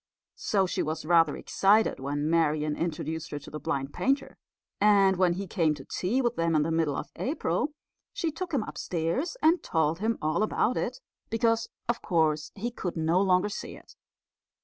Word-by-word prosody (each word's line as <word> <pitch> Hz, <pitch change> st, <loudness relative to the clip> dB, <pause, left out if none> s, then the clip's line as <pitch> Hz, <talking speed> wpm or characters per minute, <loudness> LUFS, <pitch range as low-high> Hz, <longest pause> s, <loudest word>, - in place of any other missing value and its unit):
So 195 Hz, -2 st, +1 dB
she 180 Hz, -, -1 dB
was 155 Hz, 0 st, -3 dB
rather 165 Hz, -2 st, +4 dB
excited 210 Hz, +3 st, +2 dB
when 145 Hz, +2 st, -2 dB
Marian 155 Hz, -2 st, +1 dB
introduced 160 Hz, -1 st, -3 dB
her 145 Hz, -, -4 dB
to 145 Hz, -, -10 dB
the 150 Hz, -, -5 dB
blind 140 Hz, -4 st, -3 dB
painter; 275 Hz, +1 st, 0 dB, 0.4 s
and 200 Hz, -2 st, +5 dB
when 180 Hz, -1 st, +3 dB
he 195 Hz, +3 st, -4 dB
came 165 Hz, -5 st, +1 dB
to 135 Hz, -, -11 dB
tea 240 Hz, +9 st, -1 dB
with 240 Hz, 0 st, 0 dB
them 165 Hz, -1 st, +1 dB
in 150 Hz, -, +4 dB
the 165 Hz, -, -1 dB
middle 160 Hz, -3 st, +1 dB
of -, -, -5 dB
April 295 Hz, +1 st, -1 dB, 0.4 s
she 330 Hz, -, -2 dB
took 355 Hz, +3 st, -5 dB
him 270 Hz, -8 st, +1 dB
upstairs 185 Hz, -, -2 dB
and 330 Hz, +3 st, +4 dB
told 160 Hz, 0 st, 0 dB
him 225 Hz, +3 st, 0 dB
all 155 Hz, +5 st, 0 dB
about 215 Hz, +3 st, +1 dB
it, -, -, -2 dB, 0.3 s
because, 230 Hz, 0 st, +1 dB, 0.2 s
of 240 Hz, 0 st, -1 dB
course, 155 Hz, -4 st, +1 dB
he 230 Hz, +4 st, -3 dB
could 180 Hz, -7 st, -4 dB
no 165 Hz, +3 st, +2 dB
longer 185 Hz, +1 st, +3 dB
see 205 Hz, -, -6 dB
it. -, -, -17 dB
175 Hz, 185 wpm, -28 LUFS, 155-220 Hz, 0.4 s, and